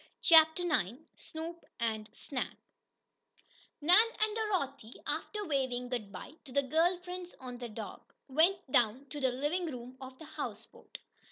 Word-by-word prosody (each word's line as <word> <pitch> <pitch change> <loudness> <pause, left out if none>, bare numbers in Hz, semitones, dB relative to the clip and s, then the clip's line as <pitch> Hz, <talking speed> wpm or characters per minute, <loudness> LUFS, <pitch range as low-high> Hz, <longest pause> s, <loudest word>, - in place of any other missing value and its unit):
CHAPTER 320 +1 +7
IX 250 - +1 0.2
SNOOP 330 +1 -7 0.2
AND 220 -2 -1
SNAP 265 -3 -4 1.2
Nan 360 +9 +7
and 430 0 +2
Dorothy, 280 - -2
after 420 -1 -2
waving 260 -5 -1
good 225 -5 -3
bye 295 - -9
to 265 - -11
the 280 +2 +2
girl 325 +7 +3
friends 360 0 -7
on 250 -2 -7
the 240 -1 -5
dock, 215 - -8
went 320 +3 +3
down 245 +3 +3
to 290 - -5
the 260 -2 +3
living 295 +8 0
room 250 -3 -7
of 260 0 -9
the 320 - -10
houseboat. 245 -8 -7
280 Hz, 150 wpm, -33 LUFS, 250-345 Hz, 1.2 s, CHAPTER